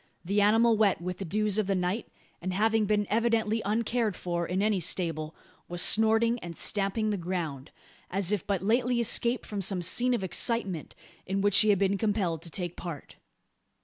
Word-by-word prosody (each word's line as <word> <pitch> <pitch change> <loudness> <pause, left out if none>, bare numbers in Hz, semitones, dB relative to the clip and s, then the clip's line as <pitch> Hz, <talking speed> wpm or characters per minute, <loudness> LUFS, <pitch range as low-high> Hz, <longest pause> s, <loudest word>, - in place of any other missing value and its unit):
The 200 +3 +1
animal 225 +2 +4
wet 205 -3 +3
with 180 +1 -5
the 195 - -4
dews 210 +3 0
of 210 - 0
the 195 - +1
night, 185 +5 -2 0.3
and 185 +1 -3
having 220 +1 +2
been 210 0 +1
evidently 225 0 +1
uncared 220 0 0
for 170 -1 -3
in 185 +2 -1
any 210 -2 +1
stable, 165 -3 0 0.3
was 175 0 -5
snorting 225 +4 +3
and 170 -4 -8
stamping 210 +1 +1
the 205 - -1
ground, 165 -6 -4 0.4
as 195 0 -1
if 210 -5 -2
but 195 -3 -1
lately 240 +3 +1
escaped 235 +1 +1
from 205 -2 -4
some 185 -1 -1
scene 245 +8 +2
of 200 - -3
excitement, 190 -3 -2 0.3
in 195 +1 -1
which 205 -1 +4
he 215 - +4
had 205 - +4
been 195 +1 +1
compelled 200 -7 -1
to 170 - -7
take 175 0 -5
part. 170 -5 -8
200 Hz, 185 wpm, -28 LUFS, 180-220 Hz, 0.4 s, animal